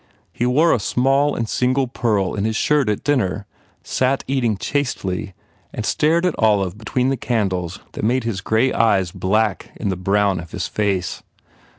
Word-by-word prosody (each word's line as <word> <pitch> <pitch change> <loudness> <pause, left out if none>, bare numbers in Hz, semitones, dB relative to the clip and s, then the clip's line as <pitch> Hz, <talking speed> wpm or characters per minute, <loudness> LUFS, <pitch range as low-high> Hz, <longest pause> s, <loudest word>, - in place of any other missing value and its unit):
He 120 - 0
wore 155 +7 +4
a - - +1
small 135 +6 +2
and 115 - -2
single 130 +4 +1
pearl 110 -6 0
in 100 - -2
his 110 0 -1
shirt 145 0 +2
at 105 - -1
dinner, 105 -8 0 0.4
sat 130 +1 0
eating 120 -6 0
chastely 100 -9 -2 0.4
and - - -4
stared 165 +3 +2
at 180 - +2
Olive 100 -4 +2
between 125 +4 -1
the 135 - 0
candles 95 -7 -1
that - - -7
made 125 +3 +1
his 110 -5 -3
grey 110 +6 +1
eyes 100 -6 +2
black 105 +2 0
in 105 - -3
the 95 - 0
brown 100 +1 +1
of 85 0 -10
his - - -2
face. 100 -5 -1
110 Hz, 175 wpm, -20 LUFS, 100-130 Hz, 0.4 s, wore